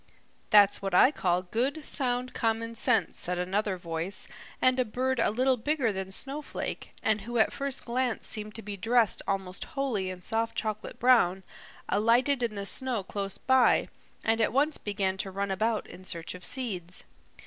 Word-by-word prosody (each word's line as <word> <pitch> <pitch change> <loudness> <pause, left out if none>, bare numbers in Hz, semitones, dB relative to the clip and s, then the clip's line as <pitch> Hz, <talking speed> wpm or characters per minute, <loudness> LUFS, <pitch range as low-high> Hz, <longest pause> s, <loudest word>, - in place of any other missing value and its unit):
"That's 205 -2 +6
what 195 -2 -2
I 255 - +7
call 180 -9 0
good, 265 - -1
sound 250 -2 0
common 230 0 -1
sense," 230 -1 +1
said 180 +1 -2
another 190 +2 -1
voice, 170 +2 -4 0.3
and 255 0 +3
a - - +4
bird 255 +2 -1
a - - +3
little 255 +4 +2
bigger 250 -2 0
than 190 0 -4
Snowflake, 275 +9 -3
and 215 -1 +2
who 240 +4 -4
at 220 - +3
first 275 -1 0
glance 245 0 -1
seemed 215 -1 -4
to 225 - -4
be 205 0 -5
dressed 225 +2 +2
almost 190 -1 -3
wholly 225 -9 0
in 180 -1 -8
soft 225 +2 0
chocolate 215 -1 -3
brown, 210 -7 +4 0.4
alighted 245 +5 +3
in 230 -3 -1
the 200 0 -4
snow 245 -1 +2
close 195 0 -4
by 260 -1 +3 0.3
and 225 +1 +2
at 220 - +2
once 290 +4 +1
began 195 -2 -1
to 195 - -3
run 195 +1 -3
about 215 +3 0
in 185 - -12
search 170 -3 -5
of 180 0 -11
seeds. 185 -10 -4
220 Hz, 175 wpm, -28 LUFS, 195-250 Hz, 0.4 s, I